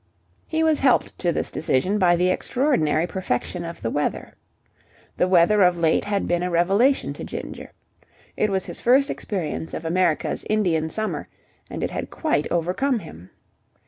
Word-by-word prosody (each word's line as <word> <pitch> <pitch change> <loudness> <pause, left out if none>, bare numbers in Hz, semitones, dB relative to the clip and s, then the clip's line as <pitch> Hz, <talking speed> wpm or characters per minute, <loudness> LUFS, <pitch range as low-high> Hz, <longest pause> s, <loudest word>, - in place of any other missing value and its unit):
He 320 0 0
was 315 -2 +3
helped 265 -3 +2
to 175 - +1
this - - -2
decision 175 +8 0
by 175 -2 +4
the 180 +1 +2
extraordinary 185 - +1
perfection 180 -2 -3
of 170 0 -8
the 115 - -1
weather. 145 - -2 0.8
The 180 - +2
weather 185 +3 +4
of 180 -1 +4
late 165 -1 +2
had 205 -1 -1
been 175 0 +1
a 180 - -1
revelation 195 +11 +2
to - - -8
Ginger. - - -7 0.7
It 215 - +1
was 190 -1 0
his - - -7
first 270 +3 +4
experience 170 -4 -4
of 165 - -6
America's 170 -1 0
Indian 175 -7 +1
Summer, 215 +5 -3 0.4
and - - -5
it - - -2
had - - -4
quite 305 - -1
overcome 180 - 0
him. 90 - -11
180 Hz, 165 wpm, -23 LUFS, 170-215 Hz, 0.8 s, by